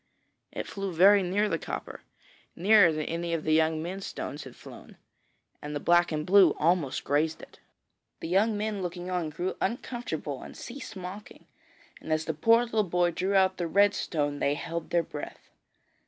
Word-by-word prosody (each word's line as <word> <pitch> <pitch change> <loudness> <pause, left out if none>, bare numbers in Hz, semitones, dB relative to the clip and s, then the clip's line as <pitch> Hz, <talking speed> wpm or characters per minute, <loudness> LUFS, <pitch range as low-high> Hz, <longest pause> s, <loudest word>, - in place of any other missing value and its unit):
It - - -5
flew 195 -1 -5
very 195 +4 +6
near 195 +4 +1
the 165 -5 -1
copper, - - -6 0.5
nearer 200 -1 +5
than 155 -1 -3
any 170 0 -2
of 155 - -4
the 155 - +1
young 160 0 +2
men's 190 +3 -5
stones 145 0 -6
had 130 - -11
flown, - - -13 0.6
and 150 0 -6
the - - -1
black 175 +3 +3
and 155 -1 -1
the - - -10
blue 195 -6 +7
almost 160 -4 +1
grazed 155 +3 0
it. - - -14 0.6
The - - -5
young 205 +5 +2
men 210 -1 -2
looking 180 0 -5
on 175 -3 -1
grew 175 +5 -3
uncomfortable 190 - -3
and - - -11
ceased 245 -3 -8
mocking, 190 +3 -9 0.6
and 160 - -7
as 155 0 0
the 160 - -2
poor 230 +10 +4
little 225 -3 0
boy 175 -1 +1
drew 190 +4 -1
out 190 -1 +3
the 175 - -2
red 200 +4 +4
stone, 145 -3 -2
they 140 - +1
held 165 +2 -5
their 170 -1 +2
breath. 150 -1 -9
175 Hz, 185 wpm, -28 LUFS, 155-195 Hz, 0.6 s, blue